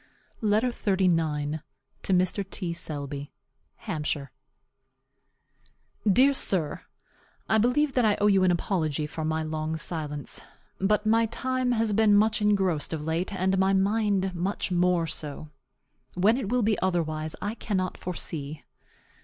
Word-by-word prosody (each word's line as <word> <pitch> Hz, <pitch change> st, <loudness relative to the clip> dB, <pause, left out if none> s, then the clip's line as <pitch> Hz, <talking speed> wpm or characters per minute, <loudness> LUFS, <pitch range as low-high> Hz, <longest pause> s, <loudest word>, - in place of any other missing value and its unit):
LETTER 215 Hz, +3 st, +2 dB
XXXIX. 165 Hz, -8 st, 0 dB, 0.4 s
TO -, -, -2 dB
MR. 185 Hz, +2 st, +1 dB
T. 180 Hz, -4 st, -2 dB
SELBY. 145 Hz, -3 st, -5 dB, 0.5 s
HAMPSHIRE. 145 Hz, -3 st, -3 dB, 1.8 s
Dear 265 Hz, +8 st, +5 dB
sir: 170 Hz, -, +1 dB, 0.7 s
I 220 Hz, -, +3 dB
believe 265 Hz, +5 st, +2 dB
that 250 Hz, -, +2 dB
I 210 Hz, -2 st, +4 dB
owe 205 Hz, -, +2 dB
you 195 Hz, -2 st, +4 dB
an 185 Hz, -, +4 dB
apology 160 Hz, -4 st, 0 dB
for 155 Hz, +1 st, -5 dB
my 160 Hz, 0 st, -1 dB
long 155 Hz, 0 st, -3 dB
silence. 150 Hz, -4 st, -4 dB, 0.4 s
But 210 Hz, +2 st, +1 dB
my 225 Hz, +1 st, +3 dB
time 255 Hz, +2 st, -1 dB
has 225 Hz, -2 st, +1 dB
been 215 Hz, 0 st, +4 dB
much 215 Hz, +1 st, +3 dB
engrossed 190 Hz, -8 st, +1 dB
of 150 Hz, -1 st, -4 dB
late, 165 Hz, +5 st, -1 dB
and 190 Hz, 0 st, 0 dB
my 190 Hz, +1 st, +3 dB
mind 195 Hz, -1 st, +1 dB
much 185 Hz, +2 st, -2 dB
more 180 Hz, -1 st, +2 dB
so. 150 Hz, -1 st, -5 dB, 0.7 s
When 200 Hz, +6 st, +4 dB
it 245 Hz, -6 st, -3 dB
will 245 Hz, 0 st, +1 dB
be 215 Hz, 0 st, +1 dB
otherwise 155 Hz, -4 st, -1 dB
I 205 Hz, -, -3 dB
cannot 190 Hz, -5 st, -2 dB
foresee. 155 Hz, -4 st, -4 dB
185 Hz, 135 wpm, -27 LUFS, 155-210 Hz, 1.8 s, Dear